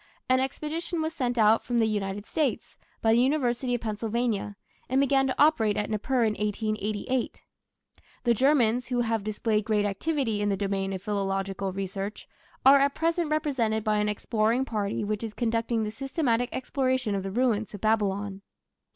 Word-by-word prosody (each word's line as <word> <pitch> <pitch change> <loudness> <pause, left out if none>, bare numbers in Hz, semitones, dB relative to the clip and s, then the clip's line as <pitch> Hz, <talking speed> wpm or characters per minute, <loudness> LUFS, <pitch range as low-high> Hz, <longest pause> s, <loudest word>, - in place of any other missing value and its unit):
An 255 0 +4
expedition 310 +6 -3
was 315 0 -2
sent 245 -3 -2
out 220 0 +4
from 240 0 -1
the 225 - +4
United 205 -1 -2
States 270 -7 -2 0.2
by 225 - +4
the 235 - +4
University 250 -2 +1
of 240 - -4
Pennsylvania, 220 -1 -2 0.3
and 260 +2 +2
began 275 -1 +3
to 260 - -1
operate 225 -9 +4
at 210 - -2
Nippur 240 +4 +1
in 220 -2 +2
1888. 215 +3 -2 0.8
The 240 - +4
Germans, 250 -1 +3
who 245 -1 0
have 225 -3 -1
displayed 215 0 0
great 210 -1 +1
activity 225 +1 -1
in 205 - +1
the 195 - 0
domain 195 -1 -1
of 190 -1 -5
philological 195 -1 -2
research, 195 +2 -5 0.4
are 275 +1 +8
at 280 0 +2
present 330 0 0
represented 260 -9 0
by 215 -1 +1
an 210 0 +1
exploring 220 +4 0
party 210 -4 -2
which 210 +1 -2
is 220 -2 -5
conducting 230 -1 0
the 210 - -3
systematic 255 -1 -1
exploration 260 -3 -1
of 195 - -1
the 195 - -4
ruins 220 -1 0
of 200 - -10
Babylon. 205 -2 0
225 Hz, 170 wpm, -27 LUFS, 205-260 Hz, 0.8 s, are